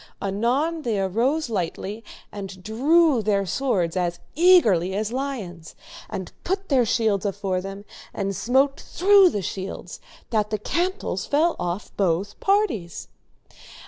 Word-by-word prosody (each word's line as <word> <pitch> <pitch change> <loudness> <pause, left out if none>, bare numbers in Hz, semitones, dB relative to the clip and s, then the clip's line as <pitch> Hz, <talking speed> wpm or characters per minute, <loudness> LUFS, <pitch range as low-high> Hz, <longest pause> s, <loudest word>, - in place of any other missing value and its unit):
Anon 250 +12 0
they 225 -7 -1
arose 240 - 0
lightly 205 +1 -4 0.3
and 195 -2 -8
drew 280 - +3
their 200 -2 +1
swords 190 -7 0
as 175 -2 -1 0.2
eagerly 225 - +4
as 215 +2 -2
lions, 215 - -5 0.3
and 185 -2 -5
put 385 +2 -2
their 255 -5 +3
shields 215 -4 +1
afore 190 -2 -2
them, 195 +2 -8 0.3
and 195 -1 -3
smote 270 +7 +2
through 390 0 +5
the 205 - -3
shields, 190 -1 -6 0.3
that 210 -2 +1
the 215 - -1
cantels 340 - -2
fell 320 +4 +2
off 175 +3 -4
both 195 +1 0
parties. 290 - 0
215 Hz, 130 wpm, -24 LUFS, 190-280 Hz, 0.3 s, through